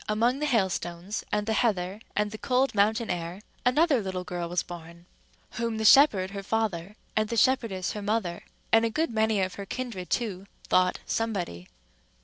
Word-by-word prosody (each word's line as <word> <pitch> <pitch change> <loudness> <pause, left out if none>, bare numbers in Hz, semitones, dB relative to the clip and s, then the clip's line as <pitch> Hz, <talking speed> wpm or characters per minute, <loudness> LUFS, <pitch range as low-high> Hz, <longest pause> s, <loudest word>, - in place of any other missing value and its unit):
among 235 +5 +2
the 300 - 0
hailstones, 190 -4 -1
and 210 0 0
the 220 - 0
heather, 200 -4 0 0.2
and 210 0 0
the 215 - -6
cold 260 +1 +1
mountain 220 +3 +2
air, 170 +1 -4 0.2
another 280 0 +3
little 185 -2 -4
girl 175 -1 -4
was 175 0 0
born, 170 0 -10 0.5
whom 230 -1 -2
the 220 - -1
shepherd 210 -8 +6
her 200 0 -5
father, 205 -3 -2 0.2
and 215 -1 +1
the 230 - -2
shepherdess 225 -6 +2
her 210 - -5
mother, 200 -4 -1 0.3
and 225 0 +6
a 230 - +2
good 315 +5 -1
many 220 -2 +2
of 185 -1 -1
her - - -6
kindred 230 -8 -5
too, 200 -5 -2 0.2
thought 185 0 +3
Somebody. 185 - -2
210 Hz, 175 wpm, -27 LUFS, 185-230 Hz, 0.5 s, shepherd